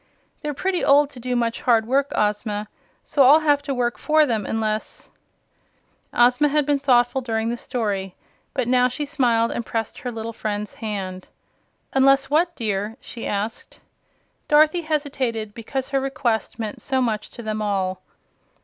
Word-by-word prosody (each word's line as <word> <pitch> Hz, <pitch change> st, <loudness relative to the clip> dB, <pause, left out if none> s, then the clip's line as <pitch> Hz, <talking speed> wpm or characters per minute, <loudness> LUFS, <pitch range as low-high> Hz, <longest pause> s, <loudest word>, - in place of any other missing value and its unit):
They're 295 Hz, -1 st, -3 dB
pretty 370 Hz, +3 st, -1 dB
old 285 Hz, +1 st, +5 dB
to 255 Hz, -, -11 dB
do 250 Hz, +1 st, -2 dB
much 235 Hz, -1 st, -1 dB
hard 230 Hz, -3 st, +3 dB
work, 275 Hz, +4 st, +1 dB
Ozma; 210 Hz, 0 st, -1 dB, 0.4 s
so 285 Hz, -, +1 dB
I'll 285 Hz, +4 st, +7 dB
have 290 Hz, -2 st, +3 dB
to 285 Hz, 0 st, -5 dB
work 240 Hz, -3 st, -1 dB
for 310 Hz, 0 st, +4 dB
them, 225 Hz, -7 st, -1 dB
unless 220 Hz, -1 st, -3 dB, 0.5 s
" -, -, -42 dB
Ozma 250 Hz, +5 st, +3 dB
had 295 Hz, 0 st, +1 dB
been 285 Hz, 0 st, +1 dB
thoughtful 250 Hz, -1 st, +3 dB
during 225 Hz, -2 st, -1 dB
the 240 Hz, -, -1 dB
story, 205 Hz, -7 st, -3 dB, 0.4 s
but 255 Hz, -4 st, 0 dB
now 250 Hz, 0 st, +4 dB
she 255 Hz, +4 st, -4 dB
smiled 240 Hz, -6 st, +1 dB
and 240 Hz, -, -3 dB
pressed 225 Hz, -1 st, -4 dB
her 250 Hz, -3 st, -4 dB
little 225 Hz, 0 st, -5 dB
friend's 210 Hz, -2 st, -4 dB
hand. 190 Hz, -4 st, -5 dB, 0.7 s
"Unless 270 Hz, +1 st, +4 dB
what, 340 Hz, +3 st, +2 dB
dear?" 210 Hz, -1 st, -2 dB
she 235 Hz, -1 st, -7 dB
asked. 210 Hz, +3 st, -4 dB, 0.7 s
Dorothy 310 Hz, +3 st, +4 dB
hesitated, 270 Hz, -9 st, -2 dB
because 255 Hz, +4 st, -4 dB
her 275 Hz, -1 st, +1 dB
request 245 Hz, -6 st, -1 dB
meant 220 Hz, -3 st, -5 dB
so 265 Hz, -1 st, 0 dB
much 220 Hz, -4 st, -1 dB
to 235 Hz, -, -10 dB
them 215 Hz, 0 st, -3 dB
all. 190 Hz, -3 st, -1 dB
240 Hz, 165 wpm, -23 LUFS, 220-275 Hz, 0.7 s, I'll